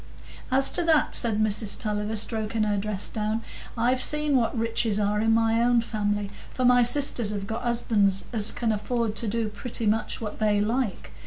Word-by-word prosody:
"As 270 +1 +3
to - - 0
that," 320 -2 +2
said 220 -3 +5
Mrs 215 -1 +1
Tulliver, 210 0 -2
stroking 220 0 -1
her 210 -1 0
dress 205 0 -3
down, 215 +1 -3 0.3
"I've 250 +3 +1
seen 300 -1 +2
what 240 0 0
riches 225 -2 0
are 210 0 0
in 225 0 +1
my 225 0 +2
own 240 0 +3
family; 205 -3 -3 0.2
for 255 - -2
my 245 0 +5
sisters 245 -2 +2
have 200 -2 -3
got 225 +3 -5
husbands 210 -5 +1
as 215 -1 +2
can 230 -2 -2
afford 220 +1 -2
to 225 - -3
do 225 +1 -1
pretty 220 +2 -4
much 215 +1 -1
what 210 -2 -7
they 210 -1 +1
like. 220 -1 -2
225 Hz, 185 wpm, -25 LUFS, 210-235 Hz, 0.3 s, said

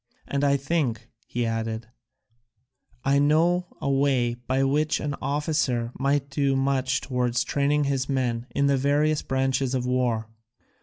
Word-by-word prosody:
And 140 0 -1
I 140 0 +3
think," 130 -6 -1 0.2
he 120 0 -2
added, 115 0 -2 1.2
"I 140 +1 +3
know 170 +5 +3
a - - -3
way 135 -3 +2
by 130 +3 -1
which 150 +3 +1
an 145 -1 -2
officer 140 -4 0
might 140 0 0
do 140 -1 +1
much 135 0 +1
towards 125 -2 0
training 145 +3 +1
his 135 -1 -1
men 125 -3 -1
in 140 - 0
the 140 -1 +3
various 145 +3 +2
branches 130 0 0
of 125 -1 -1
war. 125 -3 0
135 Hz, 145 wpm, -25 LUFS, 125-145 Hz, 1.2 s, I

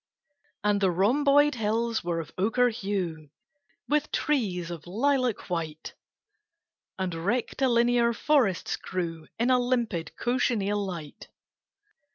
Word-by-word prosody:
And 205 -1 +2
the 190 - +4
rhomboid 280 +11 +4
hills 230 0 -1
were 170 -1 -1
of 160 - -7
ochre 230 +6 +2
hue 190 - -3 0.6
With 300 0 +1
trees 190 - -1
of 170 -1 -8
lilac 250 +3 0
white, 160 -4 -4 1.0
And 190 -2 -2
rectilinear 235 +5 +2
forests 235 - +1
grew 165 -3 -4
In 240 +3 +2
a 250 - +5
limpid 240 -9 -1
cochineal 215 -5 0
light. 170 -6 -7
210 Hz, 110 wpm, -27 LUFS, 175-245 Hz, 1.0 s, a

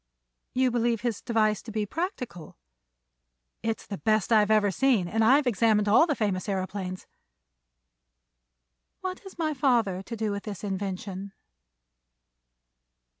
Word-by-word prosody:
"You 255 0 +3
believe 235 -2 +1
his 235 -4 -2
device 215 -3 +1
to 225 - -9
be 215 -1 -1
practical?" 250 - -5 1.0
"It's 225 0 -2
the 200 - -6
best 215 0 +1
I 220 - +7
have 210 0 +2
ever 210 -2 +4
seen, 235 -5 +2
and 225 +5 +1
I've 270 +6 +5
examined 215 -2 +2
all 220 +11 +6
the 300 - +1
famous 200 -5 -1
aëroplanes." 190 -1 -3 2.0
"What 370 0 -4
has 385 -2 -13
my 315 -2 0
father 235 -9 +1
to 230 +4 -7
do 220 -1 -1
with 200 0 -3
this 200 -4 -7
invention?" 195 0 -4
215 Hz, 135 wpm, -27 LUFS, 200-245 Hz, 2.0 s, I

